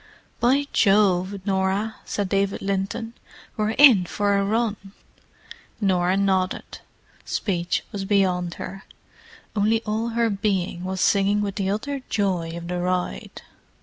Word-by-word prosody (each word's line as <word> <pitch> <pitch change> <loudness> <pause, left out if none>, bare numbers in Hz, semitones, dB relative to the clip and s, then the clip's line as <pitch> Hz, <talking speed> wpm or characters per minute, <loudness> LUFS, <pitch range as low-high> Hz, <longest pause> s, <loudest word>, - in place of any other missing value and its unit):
"By 265 +4 +3
Jove, 195 -2 +3
Norah!" 195 +2 0
said 205 -2 -2
David 195 +1 0
Linton, 200 +4 -2 0.4
"we're 215 0 -1
in 250 -11 +7
for 205 +1 0
a 200 - +2
run!" 220 +1 0 1.0
Norah 185 -2 +2
nodded. 190 -2 -1 0.4
Speech 175 -4 -1
was 200 -3 -4
beyond 185 -3 +1
her; 195 +1 -8 0.7
only 220 +2 +2
all 220 +2 -2
her 230 -1 +2
being 195 -3 -1
was 185 0 -3
singing 200 +1 +3
with 200 -1 -2
the 195 -1 -2
utter 270 +7 -3
joy 180 -5 -1
of 170 0 -7
the 180 0 -2
ride. 180 - -3
195 Hz, 130 wpm, -23 LUFS, 185-215 Hz, 1.0 s, in